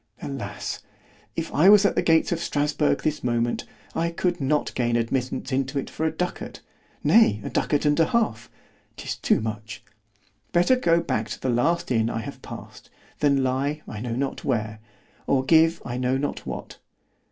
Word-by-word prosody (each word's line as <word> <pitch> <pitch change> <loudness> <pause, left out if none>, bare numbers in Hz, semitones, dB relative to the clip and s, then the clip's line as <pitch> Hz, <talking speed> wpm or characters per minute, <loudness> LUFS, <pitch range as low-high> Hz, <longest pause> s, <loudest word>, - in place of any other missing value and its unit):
—Alas! 135 -3 -5 0.5
if - - -4
I 175 +6 +6
was 205 0 +7
at 200 - +3
the - - +1
gates 160 -1 +3
of 170 - 0
Strasburg 150 -2 0
this 155 -1 -1
moment, 120 -1 0 0.3
I 165 +1 0
could 175 0 -1
not 145 +2 0
gain 120 -1 0
admittance 125 +4 -1
into 135 +2 -1
it 140 - -3
for 160 - -1
a - - 0
ducat—nay 180 - 0
a - - -5
ducat 145 0 0
and 150 +2 +3
half—'tis 220 +8 -2
too - - +2
much—better 110 - -3
go 170 -8 +3
back 110 -7 -2
to - - -5
the 130 - -2
last 130 +7 +1
inn 115 -2 +2
I 115 - -2
have - - -8
passed——than 140 -2 -3
lie 140 +4 -1
I 105 - -6
know 115 +1 -3
not 135 +1 -3
where——or 110 +2 -3
give 165 +2 +4
I 120 0 -4
know 125 +1 +1
not 145 +2 -3
what. - - -7
135 Hz, 160 wpm, -25 LUFS, 115-160 Hz, 0.5 s, was